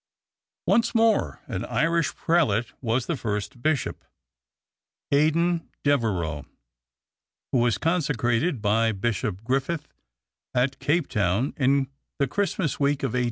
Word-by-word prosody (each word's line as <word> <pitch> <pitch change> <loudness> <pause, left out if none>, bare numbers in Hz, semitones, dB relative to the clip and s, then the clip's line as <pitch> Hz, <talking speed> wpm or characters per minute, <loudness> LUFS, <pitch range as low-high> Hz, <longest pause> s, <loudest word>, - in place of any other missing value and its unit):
Once 235 +1 +2
more 220 - +2
an - - -4
Irish 165 +6 +1
prelate 125 -10 +1
was 120 0 0
the 170 - -1
first 105 -1 -4
Bishop 155 +1 -1 1.1
Aidan 165 +4 +2
Devereux, 95 - 0 1.1
who 130 - +3
was 120 -3 +2
consecrated 140 -3 0
by 110 +2 +3
Bishop 105 -1 -2
Griffith 135 +6 -1 0.7
at 130 +2 +1
Cape 160 +1 +1
Town 105 +4 0
in 135 0 +2 0.3
the 140 - +2
Christmas 185 -2 -1
week 140 0 +1
of 135 - +1
1847. 125 - +1
135 Hz, 115 wpm, -25 LUFS, 115-155 Hz, 1.1 s, who